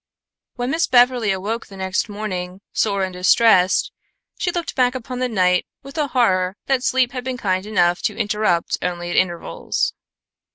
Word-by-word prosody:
When 245 +1 -2
Miss 330 +3 +1
Beverly 245 -3 +4
awoke 205 +5 -3
the 195 - -12
next 190 +3 -1
morning, 190 -3 -5
sore 200 -3 +1
and 185 -1 -3
distressed, 185 0 +4 0.5
she - - 0
looked 345 -1 -3
back 250 -1 +2
upon 250 0 -5
the 255 0 0
night 180 -4 +2 0.2
with 275 0 -11
a 300 -2 0
horror 190 -7 +1
that 270 -2 +1
sleep 255 -1 +2
had 250 -1 -5
been 255 0 -3
kind 185 -3 -1
enough 175 -4 +2
to 210 - -12
interrupt 210 -5 0
only 175 -1 -3
at - - -2
intervals. 175 - -1
210 Hz, 170 wpm, -21 LUFS, 185-250 Hz, 0.5 s, Beverly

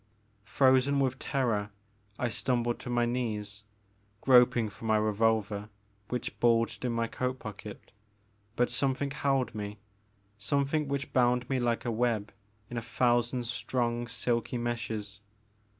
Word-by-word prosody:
Frozen 130 +5 +4
with 130 -1 0
terror 115 -7 0 0.5
I 120 - 0
stumbled 120 +1 0
to - - -7
my 120 -1 +2
knees, 105 -4 -3 0.6
groping 125 -2 +5
for 105 +2 -10
my 110 -1 +3
revolver 105 -1 +1 0.4
which 125 - -4
bulged 115 0 +2
in 125 - 0
my 115 0 0
coat 125 +3 -2
pocket; 110 -4 -9 0.6
but 125 0 +2
something 140 0 0
held 135 -3 0
me 105 0 -5 0.3
— - - -40 0.3
something 140 +7 0
which 140 +1 -3
bound 125 -1 +3
me 130 - +2
like 120 -1 0
a 120 - 0
web 110 -2 0 0.3
in 120 - -6
a - - -1
thousand 120 +1 +1
strong 120 0 -1
silky 115 +1 -1
meshes. 110 -3 -3
120 Hz, 135 wpm, -30 LUFS, 110-125 Hz, 0.6 s, groping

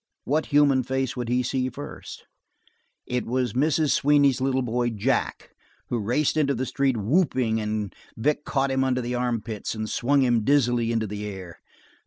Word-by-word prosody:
What 155 +3 0
human 145 -3 +4
face 130 0 -2
would 120 -2 -4
he 125 +1 +1
see 130 +1 -1
first? 145 +4 -9 0.8
It 125 -1 -2
was 125 -2 -1
Mrs. 150 +2 +2
Sweeney's 140 -2 +3
little 130 0 +1
boy, 120 0 0
Jack, 105 -3 -1 0.4
who 120 - -1
raced 125 +8 0
into 140 -3 +2
the 130 +3 -2
street 135 -2 0
whooping, 120 - +1
and 105 -1 -3 0.2
Vic 145 +6 0
caught 135 -1 0
him 135 0 +1
under 130 -1 0
the 120 +1 -3
armpits 115 -4 -2
and 110 0 -3
swung 135 +6 +2
him 120 -3 +2
dizzily 120 -3 +2
into 115 -1 0
the 105 0 -5
air. 95 -4 -8
125 Hz, 170 wpm, -25 LUFS, 115-135 Hz, 0.8 s, human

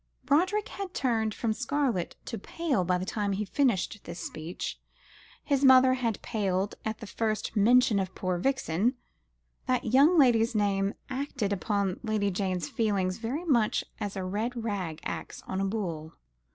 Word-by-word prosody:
Roderick 370 +8 +2
had 395 -2 -6
turned 225 -4 +1
from 225 -2 0
scarlet 250 -6 -1
to 230 - -5
pale 285 - -1
by 180 +1 +1
the 180 - -3
time 205 0 -1
he 210 +2 -2
finished 220 -3 +1
this 170 +1 -7
speech. 155 +3 -5 0.6
His 280 -2 +1
mother 260 -1 +7
had 235 -5 -2
paled 200 -3 -1
at 220 0 -3
the 225 - -8
first 215 +1 -2
mention 225 0 +5
of 190 -1 -3
poor 185 -2 -1
Vixen. 245 - +1 0.7
That 250 -2 0
young 295 +7 +6
lady's 235 -4 +4
name 200 -1 +1 0.2
acted 260 -6 -2
upon 200 -1 -1
Lady 215 -3 0
Jane's 185 -4 -1
feelings 195 -3 0
very 260 +10 -3
much 235 -9 +2 0.2
as 205 -1 -4
a 190 - -3
red 220 +6 -2
rag 185 -8 -3
acts - - -6
on 190 - -2
a - - +1
bull. 170 -6 -4
215 Hz, 160 wpm, -29 LUFS, 190-255 Hz, 0.7 s, mother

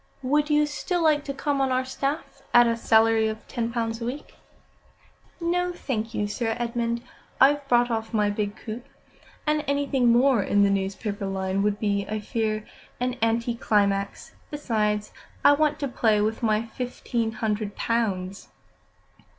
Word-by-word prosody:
'" - - -36
"Would 300 0 +3
you 300 0 +4
still 340 +4 -2
like 300 -2 +3
to 280 - -3
come 280 0 -1
on 265 -1 +1
our 255 0 +1
staff 275 +3 -4
at 240 0 +8
a 230 0 +2
salary 225 -1 +4
of 220 0 -6
ten 235 -2 -2
pounds 230 -1 -2
a - - -2
week?" 270 +5 -6 1.1
"No, 355 +1 0
thank 230 -10 -3
you, 210 - 0
Sir 225 +2 -2
Edmund. 235 0 -2 0.4
I've 285 +1 +4
brought 240 -1 +3
off 225 -1 -2
my 210 -3 +2
big 205 0 -2
coup, 220 +2 -7 0.6
and 300 0 +1
anything 275 -3 +2
more 245 -1 +4
in 200 +1 +3
the 200 - +3
newspaper 195 +1 -2
line 190 0 -1
would 205 0 +1
be, 200 -2 0
I 215 0 -2
fear, 215 -1 -2 0.3
an 250 0 -1
anticlimax. 220 -4 0 0.2
Besides, 215 -7 -1 0.3
I - - +9
want 300 0 +2
to 280 - 0
play 220 -4 +2
with 215 +2 0
my 215 -1 +2
fifteen 230 -1 -3
hundred 215 -2 -2
pounds." 200 -5 -2
230 Hz, 160 wpm, -25 LUFS, 210-265 Hz, 1.1 s, I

